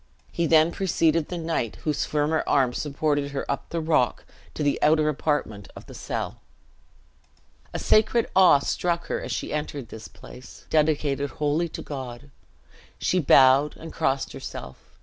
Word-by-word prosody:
He 170 -1 -1
then 160 +1 +5
preceded 165 -4 +1
the 180 - -4
knight, 160 -9 -2
whose 150 -2 -1
firmer 155 +1 0
arm 130 -4 +2
supported 145 0 -1
her 135 - -3
up 140 - -4
the 170 - -2
rock, 155 -7 +1 0.3
to 150 - -2
the 145 - 0
outer 155 0 +3
apartment 145 -9 -2
of - - -11
the - - -12
cell. - - -5 1.3
A - - -4
sacred 220 +2 +3
awe 185 -5 +7
struck 170 +4 -2
her - - -2
as - - -6
she - - -3
entered 145 -5 -4
this 110 -1 -9
place, 125 +1 -14
dedicated 150 -2 +1
wholly 150 +4 -1
to - - -7
God. 130 -1 -8 0.7
She 185 - +1
bowed, 135 -1 +5
and 165 - -10
crossed 135 0 -1
herself. 65 - -8
150 Hz, 155 wpm, -25 LUFS, 140-160 Hz, 1.3 s, awe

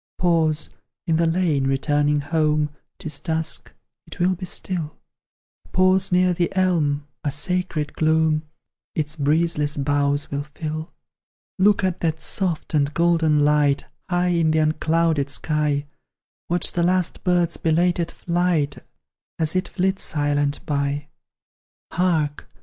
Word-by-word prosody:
Pause, 165 -3 +1 0.3
in 165 -3 +1
the 165 0 +2
lane, 165 -5 +1
returning 145 +2 +1
home; 150 0 +1 0.3
'Tis 155 -6 -3
dusk, 160 0 -2 0.4
it - - -10
will 180 +2 +3
be 185 0 -6
still: 170 -4 -3 0.8
Pause 185 +1 +3
near 180 0 +3
the 175 0 0
elm, 155 -6 +1 0.2
a 145 - 0
sacred 155 0 -2
gloom 160 -1 +2 0.5
Its 150 -1 -1
breezeless 150 0 +1
boughs 145 0 0
will 140 0 -1
fill. 155 +2 -6 0.7
Look 205 +1 +4
at 185 -1 0
that 160 -1 -1
soft 175 -2 -1
and 145 -1 +2
golden 165 -3 +3
light, 145 -1 +2 0.2
High 180 0 +1
in 170 -2 +2
the 160 - +2
unclouded 155 -1 +1
sky; 150 -1 0 0.6
Watch 175 0 +4
the 175 - -1
last 180 0 0
bird's 175 -2 +1
belated 170 +1 +1
flight, 170 -5 0 0.6
As 160 +1 0
it 185 0 0
flits 190 +1 -1
silent 145 -1 0
by. 145 0 -2 0.8
Hark! 160 -5 0
160 Hz, 125 wpm, -22 LUFS, 145-175 Hz, 0.8 s, Look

